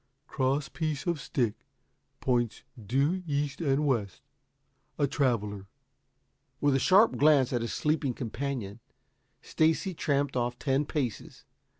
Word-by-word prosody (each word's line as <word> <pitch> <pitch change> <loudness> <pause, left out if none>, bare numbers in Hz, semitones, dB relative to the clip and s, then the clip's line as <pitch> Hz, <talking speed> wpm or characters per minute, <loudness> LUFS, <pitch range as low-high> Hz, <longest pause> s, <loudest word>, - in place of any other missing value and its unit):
Cross 135 +1 -1
piece 155 -4 -3
on 175 -1 +1
stick, 120 -7 -1 0.7
points 120 -3 0 0.2
due 140 - +1
east 145 +1 -2
and 145 -1 +1
west. 115 -9 -1 0.7
A 145 - +3
Traveler.'" 105 -8 -1 0.9
With 145 -1 +3
a 135 - +3
sharp 200 - +5
glance 145 -4 +4
at 120 - 0
his 115 - -3
sleeping 150 -4 0
companion, 120 -3 -4 0.6
Stacy 160 +4 +1
tramped 140 -3 0
off 120 0 -1
ten 140 +1 0
paces. 135 -8 -4
135 Hz, 120 wpm, -29 LUFS, 120-150 Hz, 0.9 s, sharp